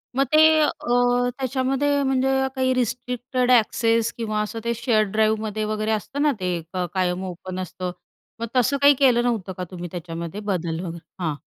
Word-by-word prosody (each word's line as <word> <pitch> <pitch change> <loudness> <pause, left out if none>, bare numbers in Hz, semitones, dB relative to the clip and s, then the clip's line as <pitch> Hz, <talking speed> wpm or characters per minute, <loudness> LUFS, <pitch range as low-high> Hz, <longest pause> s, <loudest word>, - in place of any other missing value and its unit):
मग 270 - +3
ते 315 0 +6
अ, 300 - +4 0.7
त्याच्यामध्ये 270 +2 0
म्हणजे 265 0 +1 0.3
काही 260 0 +1
रिस्ट्रिक्टेड 250 +1 -1
एक्सेस 230 -1 +3
किंवा 215 -2 -1
असं 210 +2 -4
ते 235 - +1
शेअर 220 -2 +2
ड्राईव्हमध्ये 215 0 0
वगैरे 215 0 -1
असतं 220 +7 -2
ना, 300 - +4
ते 180 -2 -1
क 180 -1 -1
कायम 185 -1 0
ओपन 185 +1 -6
असतं, 185 0 -4 0.5
मग 230 - -3
तसं 255 +3 +3
काही 285 0 +8
केलं 250 -4 +4
नव्हतं 215 -6 -1
का 185 - -3
तुम्ही 175 -1 -6
त्याच्यामध्ये 170 +1 -6
बदल 170 -5 -2
वगैरे? 170 0 -6 0.2
हां. 155 -3 -1
220 Hz, 165 wpm, -23 LUFS, 185-255 Hz, 0.7 s, काही